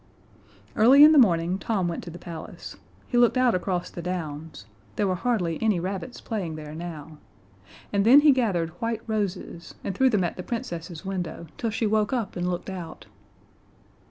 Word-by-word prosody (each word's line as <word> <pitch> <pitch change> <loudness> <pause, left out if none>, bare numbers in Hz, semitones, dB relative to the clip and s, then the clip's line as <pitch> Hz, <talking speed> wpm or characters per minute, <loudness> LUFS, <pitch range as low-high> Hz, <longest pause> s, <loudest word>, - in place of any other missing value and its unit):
Early 260 +6 +7
in 305 - +9
the 305 - +6
morning 180 -4 +3
Tom 195 -6 -1
went 170 - -4
to - - -7
the 170 - -9
palace. 170 -2 -9 0.3
He 245 - +1
looked 240 +1 +4
out 255 -2 +4
across 180 -1 -2
the 175 - -7
downs 160 - -5 0.3
there - - +1
were 190 - +1
hardly 180 -5 -1
any 215 -5 +2
rabbits 190 +7 -5
playing 190 -9 -4
there 150 -1 -8
now 160 -2 -8 0.7
and 200 -1 +2
then 260 +7 +8
he 295 0 +7
gathered 195 -11 0
white 230 -1 -2
roses 195 -5 -4
and 195 - -3
threw 260 +7 +3
them 210 -6 +1
at 175 - -3
the - - -4
Princess's 175 -5 -6
window 180 -3 -4
till 230 - -2
she 225 +1 -1
woke 215 +1 +1
up 230 -6 -2
and 180 0 -1
looked 180 +2 -4
out. 175 -4 -8
185 Hz, 185 wpm, -25 LUFS, 170-225 Hz, 0.7 s, in